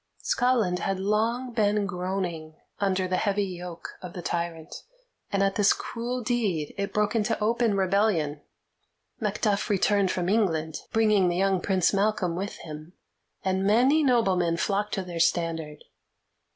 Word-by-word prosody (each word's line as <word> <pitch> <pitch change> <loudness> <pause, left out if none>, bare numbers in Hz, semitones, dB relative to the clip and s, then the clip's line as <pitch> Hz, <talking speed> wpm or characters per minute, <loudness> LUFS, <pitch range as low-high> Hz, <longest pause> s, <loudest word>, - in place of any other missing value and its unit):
Scotland 235 -8 +1
had 195 -1 -2
long 225 +5 0
been 210 -2 +2
groaning 180 -4 -4 0.2
under 190 -2 +1
the 185 0 0
heavy 200 0 +1
yoke 180 -2 -8
of 180 -2 -8
the 175 - -7
tyrant, 170 -2 -3 0.6
and 200 -1 +2
at 195 0 0
this 205 -1 +5
cruel 245 +2 -4
deed 210 -10 -1
it 200 0 -3
broke 210 +2 0
into 215 -2 0
open 225 -1 +1
rebellion. 185 -6 +1 0.8
Macduff 210 -1 0
returned 200 -1 +2
from 180 -1 -1
England, 165 -7 +1
bringing 215 -4 +3
the 175 - -1
young 190 -1 +2
Prince 190 -1 +2
Malcolm 195 -4 +1
with 195 +3 -4
him, 155 +2 -9 0.5
and 190 0 +1
many 250 +10 +4
noblemen 190 - +2
flocked 205 +3 -1
to 195 - -2
their 175 -2 -6
standard. 165 -3 0
195 Hz, 145 wpm, -26 LUFS, 175-210 Hz, 0.8 s, this